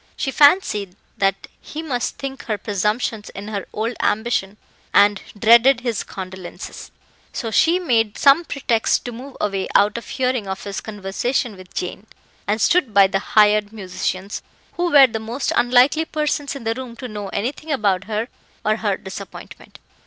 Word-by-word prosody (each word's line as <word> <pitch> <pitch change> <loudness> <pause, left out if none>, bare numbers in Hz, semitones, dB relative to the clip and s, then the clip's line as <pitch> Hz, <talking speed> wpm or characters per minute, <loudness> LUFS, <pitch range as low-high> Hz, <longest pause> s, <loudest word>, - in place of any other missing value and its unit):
She 270 - -1
fancied 260 - +3 0.2
that 195 0 +1 0.2
he 310 +2 -7
must 250 -7 -2
think 270 -1 -6
her 215 -2 -1
presumptuous 210 +2 -2
in 205 +2 -7
her 200 -3 -4
old 225 +3 -2
ambition, 210 -2 0 0.4
and 205 0 +5 0.2
dreaded 235 +4 +6
his 235 -4 -1
condolences; 190 -1 -8 0.4
so 225 -3 -4
she 330 - +4
made 230 - +1
some 280 +4 +5
pretext 245 -8 0
to 245 - -4
move 260 +4 -10
away 195 -2 -1
out 205 +3 +4
of - - -15
hearing 255 -5 -1
of 190 0 -5
his 200 -1 -5
conversation 215 +3 -2
with 185 -1 -15
Jane, 190 +4 -5 0.4
and 210 +2 +1
stood 260 - +2
by 200 -1 +8
the 195 0 0
hired 210 0 +3
musicians, 190 -1 -4 0.3
who 350 0 0
were 280 -2 +9
the 225 -3 -3
most 230 +5 -3
unlikely 255 +6 +4
persons 300 -2 -2
in 275 - -7
the 225 0 0
room 250 -1 -8
to 250 +2 -7
know 210 -3 -6
anything 265 +11 -3
about 200 -8 +1
her 220 +2 -2 0.4
or 215 +1 +2
her 205 -3 -1
disappointment. 190 +1 -10
220 Hz, 165 wpm, -21 LUFS, 200-255 Hz, 0.4 s, were